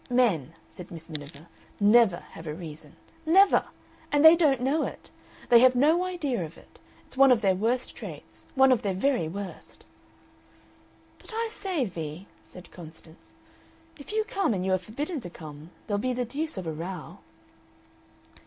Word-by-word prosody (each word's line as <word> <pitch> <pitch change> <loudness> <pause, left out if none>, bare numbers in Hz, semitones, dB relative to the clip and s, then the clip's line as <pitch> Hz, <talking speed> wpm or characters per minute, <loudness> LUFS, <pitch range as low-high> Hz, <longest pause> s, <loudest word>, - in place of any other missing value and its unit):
"Men," 195 - +1
said 180 -2 -11
Miss 165 0 -10
Miniver, 145 0 -9 0.3
"NEVER 205 -3 +4
have 160 - -10
a 150 - -4
reason. 155 -3 -10 0.3
Never! 380 +5 +5 0.5
And 290 +1 +4
they 320 +1 +10
don't 295 -7 +3
know 275 +5 +1
it! - - -7 0.4
They 235 - +8
have 255 +1 +5
no 315 +8 +3
idea 295 - -2
of 160 0 -9
it. - - -19 0.3
It's - - -10
one 270 -1 +7
of 235 -3 +4
their 195 -3 +3
worst 230 +7 -1
traits, - - -10
one 265 0 +6
of 250 - +3
their 200 -4 -2
very 195 - +1
worst." 195 +3 -8 1.3
"But 440 - -8
I 455 0 -1
say, 370 - -2
Vee," 165 -2 -6 0.2
said 180 -1 -14
Constance, 160 -1 -14 0.6
"if 285 - -9
you 435 0 +1
come 390 - -1
and 185 -1 -2
you 190 - +1
are 185 - +2
forbidden 285 - -5
to 200 - -8
come 155 -2 -11 0.2
there'll 205 -2 -1
be 255 +4 -1
the 250 0 -2
deuce 290 +3 -3
of 185 - -5
a 160 - -3
row." 170 +1 -7
220 Hz, 170 wpm, -27 LUFS, 170-280 Hz, 1.3 s, they